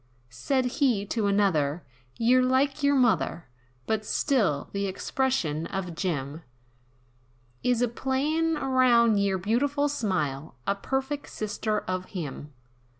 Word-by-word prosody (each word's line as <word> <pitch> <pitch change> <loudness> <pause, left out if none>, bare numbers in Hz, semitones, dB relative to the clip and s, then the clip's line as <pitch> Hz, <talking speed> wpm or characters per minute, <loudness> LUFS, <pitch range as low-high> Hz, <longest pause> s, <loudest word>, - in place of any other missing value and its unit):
Said 255 - 0
he 245 -5 +1
to 210 0 -1
another, 175 -7 +1 0.3
"Yer 245 +2 +4
like 265 +3 +1
yer 285 0 +3
mother, 240 -9 +1 0.4
But 220 -1 -1
still 210 - 0
the 200 0 -1
expression 190 - -1
of 190 -3 -4
Jim, 160 -4 -3 1.2
Is 245 -1 +1
a - - +3
playin' 300 +7 0
around 250 -5 +4
yer 200 -1 +1
beautiful 275 +9 +1
smile, 170 - -2
A 200 - +2
perfeck 270 +7 -3
sister 215 0 -2
of 185 0 -3
him. 150 -6 -6
220 Hz, 120 wpm, -27 LUFS, 185-265 Hz, 1.2 s, Yer